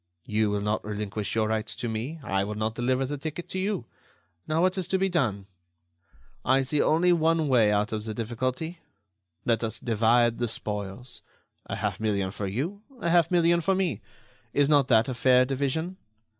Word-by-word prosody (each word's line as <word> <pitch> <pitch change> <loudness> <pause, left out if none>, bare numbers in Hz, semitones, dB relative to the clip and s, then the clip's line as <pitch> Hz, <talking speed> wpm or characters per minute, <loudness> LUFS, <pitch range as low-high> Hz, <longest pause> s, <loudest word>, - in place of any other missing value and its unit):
You 105 0 +1
will 105 0 -1
not 105 +1 -1
relinquish 105 0 -4
your 110 -1 +2
rights 110 0 -2
to 120 - -4
me; 115 +9 -4
I 95 -3 0
will 105 +1 -4
not 110 +1 -1
deliver 130 +3 0
the 145 +1 -4
ticket 160 +4 -5
to 190 - -3
you. 195 - -1 0.6
Now, 155 +1 +1
what 185 +1 +3
is 185 -3 -2
to 190 - +1
be 190 0 +1
done? 115 - 0 1.0
"I 135 +1 +3
see 145 +3 +1
only 175 +3 +4
one 165 -1 +2
way 115 -6 +4
out 105 +1 +1
of 110 -1 -3
the 110 -1 -4
difficulty: 130 +9 -3 0.7
Let 115 -2 +1
us 110 - -2
divide 115 +1 +2
the 120 - 0
spoils. 105 +2 -5 0.5
A - - -3
half - - -2
million 100 -3 0
for 100 0 -4
you; 150 - -3 0.2
a 170 -5 0
half 170 -2 +4
million 170 -1 +3
for 190 +3 +2
me. 175 - -1 0.5
Is 145 -1 +3
not 145 -3 +4
that 115 -2 +4
a 130 - -2
fair 125 +1 +4
division? 140 +7 -2
125 Hz, 190 wpm, -27 LUFS, 110-160 Hz, 1.0 s, only